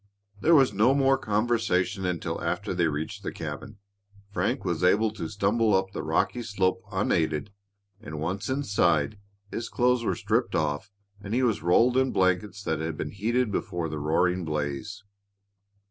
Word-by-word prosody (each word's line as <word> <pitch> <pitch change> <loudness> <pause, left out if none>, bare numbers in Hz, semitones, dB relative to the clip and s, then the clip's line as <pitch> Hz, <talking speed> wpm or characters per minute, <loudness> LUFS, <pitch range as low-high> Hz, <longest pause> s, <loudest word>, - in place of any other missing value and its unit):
There 165 +9 +5
was 135 -7 +5
no 115 +7 +4
more 135 -1 +4
conversation 105 -5 0
until 85 -2 -3
after 90 +4 -2
they 85 -2 +2
reached 75 0 -4
the - - -4
cabin. 105 -3 -7 0.5
Frank 100 +8 -1
was 85 -1 -1
able 105 +4 +4
to 100 -7 -5
stumble 105 +1 +2
up 95 0 0
the - - -4
rocky 125 - 0
slope 100 -1 0
unaided, 85 -3 0 0.5
and, 80 -9 -7
once 90 +8 -3
inside, 100 - +1 0.3
his 115 - -4
clothes 125 0 +2
were - - 0
stripped 115 +4 0
off 75 +4 -1 0.3
and 105 +2 -3
he 130 - +2
was 115 -4 +1
rolled 115 +9 +4
in 130 0 +2
blankets 95 +2 0
that 80 -4 -1
had 80 0 -3
been 75 - -4
heated 115 +4 0
before 85 -4 -2
the 75 0 -4
roaring 90 +5 +1
blaze. 75 +7 -3
100 Hz, 160 wpm, -27 LUFS, 85-115 Hz, 0.5 s, There